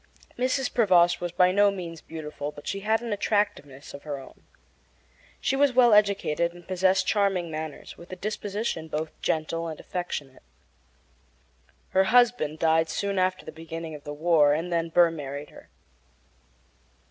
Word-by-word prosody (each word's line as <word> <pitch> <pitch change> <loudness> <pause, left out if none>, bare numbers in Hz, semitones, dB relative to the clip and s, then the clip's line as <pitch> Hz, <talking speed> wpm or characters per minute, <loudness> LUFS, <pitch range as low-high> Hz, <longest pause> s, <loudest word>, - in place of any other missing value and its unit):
Mrs. 255 +1 0
Prevost 175 -6 +4
was 175 -1 -3
by 180 +1 +4
no 205 +2 +4
means 175 -4 -6
beautiful, 150 -2 -6
but 145 - -13
she 195 - -3
had 220 +3 0
an 230 -3 -2
attractiveness 195 -10 -2
of 140 - -9
her 145 -2 -5
own. 135 - -13 1.0
She - - 0
was 280 -1 +3
well 240 -2 +6
educated 195 -5 +2
and 175 -1 -15
possessed 185 0 +2
charming 195 -5 +1
manners, 155 -1 -7
with 170 - -13
a - - -4
disposition 205 -4 -3
both 155 0 -3
gentle 165 +1 -1
and 160 -2 -6
affectionate. 150 -7 -5 1.5
Her 190 0 +3
husband 235 -9 +3
died 160 0 +2
soon 200 -1 -1
after 185 0 0
the - - -7
beginning 165 0 -7
of 150 -1 -10
the 145 - -7
war, 150 -1 +3
and 170 +3 -3
then 165 0 0
Burr 170 0 +5
married 145 -2 -7
her. - - -15
175 Hz, 160 wpm, -26 LUFS, 155-200 Hz, 1.5 s, well